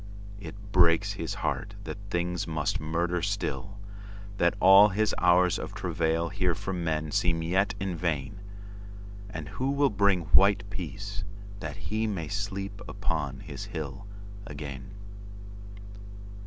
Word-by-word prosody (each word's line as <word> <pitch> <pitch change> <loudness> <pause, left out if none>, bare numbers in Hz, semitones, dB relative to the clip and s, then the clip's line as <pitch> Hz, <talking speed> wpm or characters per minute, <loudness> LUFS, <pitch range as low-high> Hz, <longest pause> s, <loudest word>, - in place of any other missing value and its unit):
It 100 - -8 0.2
breaks 85 -3 +4
his - - -4
heart 100 +1 -2
that 100 - -6
things 90 -1 -1
must 80 -2 -1
murder 85 +3 0
still, 100 +1 -2 0.6
That 85 -2 +3
all 95 +3 +9
his 105 +1 +1
hours 90 0 +4
of - - -6
travail 85 0 0
here 90 -1 0
for 95 - -4
menSeem 80 0 0
yet 100 +4 +2
in 95 -2 -2
vain. 80 +2 -2 0.9
And 105 - -6
who 130 +1 -2
will 140 -1 +3
bring 100 -3 +3
white 100 0 +5
peaceThat 100 +1 -6
he 110 +3 -2
may 85 -7 -3
sleep 100 0 -3
upon 80 -9 -2
his - - -7
hill 80 +7 -6 0.4
again? 70 +1 -7
95 Hz, 125 wpm, -28 LUFS, 85-100 Hz, 0.9 s, all